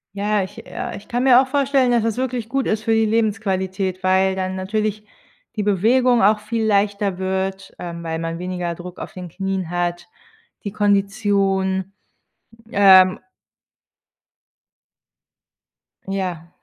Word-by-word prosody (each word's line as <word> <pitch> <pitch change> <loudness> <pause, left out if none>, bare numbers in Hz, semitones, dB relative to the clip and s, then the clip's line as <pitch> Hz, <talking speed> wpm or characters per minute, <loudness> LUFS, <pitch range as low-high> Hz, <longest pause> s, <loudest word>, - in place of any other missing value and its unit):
Ja, 205 0 0
ich 225 +4 -9
äh, 240 -1 -5
ich 200 - -11
kann 245 +1 -1
mir 255 -1 +7
auch 265 - -3
vorstellen, 275 -2 +2
dass 235 -2 +2
das 225 -1 -1
wirklich 250 -3 -2
gut 270 +2 -1
ist 215 0 -1
für 225 - +1
die 225 0 +3
Lebensqualität, 195 -4 -1
weil 190 0 +2
dann 185 0 -3
natürlich 210 +2 -2 0.5
die 210 - -1
Bewegung 235 +5 +3
auch 210 +2 +5
viel 220 +2 -3
leichter 200 -2 +1
wird, 190 +1 -3
ähm, 170 -1 -6
weil 160 -1 -3
man 165 0 -4
weniger 180 -1 -4
Druck 180 +1 -10
auf - - -7
den 180 -1 -7
Knien 190 -1 -3
hat, 175 0 -2 0.6
die 200 - -3
Kondition, 195 -2 +1 0.8
ähm 190 -2 +6 2.9
Ja. 180 -4 -4
195 Hz, 135 wpm, -21 LUFS, 185-220 Hz, 2.9 s, mir